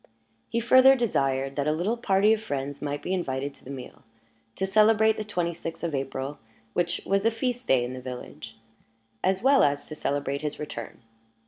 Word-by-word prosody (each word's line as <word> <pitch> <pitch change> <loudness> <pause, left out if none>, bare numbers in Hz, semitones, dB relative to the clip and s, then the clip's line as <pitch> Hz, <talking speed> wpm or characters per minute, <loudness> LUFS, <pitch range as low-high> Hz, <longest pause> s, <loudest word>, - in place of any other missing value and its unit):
He 230 - 0
further 260 +3 +7
desired 135 - 0
that 140 0 0
a - - +3
little 175 +9 0
party 210 -2 +3
of 220 - -1
friends 140 -6 -4
might 145 0 -3
be 185 - -2
invited 140 -6 -2
to - - -20
the - - -11
meal, 135 -2 -8 0.5
to 190 - -1
celebrate 215 +2 +4
the 215 - -4
twenty 175 -5 -2
sixth 165 0 -7
of 170 -2 -2
April 135 +1 -3 0.3
(which 175 0 -1
was 195 0 +1
a 225 - +4
feast 245 +2 -3
day 130 -2 +4
in 125 - -5
the 130 - -7
village), 125 -3 -8 0.7
as 190 +2 +1
well 275 +1 +6
as 145 0 +1
to - - -6
celebrate 140 -1 -2
his 150 -1 -3
return. 115 -6 -7
165 Hz, 195 wpm, -26 LUFS, 140-215 Hz, 0.7 s, further